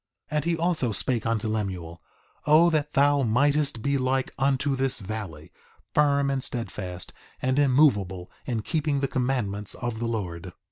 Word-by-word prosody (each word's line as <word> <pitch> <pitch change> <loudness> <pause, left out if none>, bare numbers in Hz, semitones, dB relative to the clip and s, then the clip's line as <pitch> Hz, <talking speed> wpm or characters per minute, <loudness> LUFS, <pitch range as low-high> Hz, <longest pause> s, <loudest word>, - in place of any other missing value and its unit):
2:10 - - -2
And 150 - 0
he 170 -1 +1
also 165 -8 0
spake 115 +2 0
unto 115 -1 0
Lemuel: 95 -6 -4 0.5
O 160 +3 +6
that 150 -2 -1
thou 145 +1 +4
mightest 140 +1 +1
be 140 0 +1
like 130 +1 0
unto 135 +1 +1
this 135 -1 0
valley, 95 -7 -7 0.4
firm 140 -2 +3
and 135 -1 -1
steadfast, 95 -6 -3 0.3
and 130 +2 +1
immovable 105 -11 +2 0.2
in 115 -4 -2
keeping 150 -1 0
the 135 - +1
commandments 120 -7 -1
of 120 -2 -4
the 120 - -2
Lord! 90 -6 -4
130 Hz, 155 wpm, -26 LUFS, 105-140 Hz, 0.5 s, O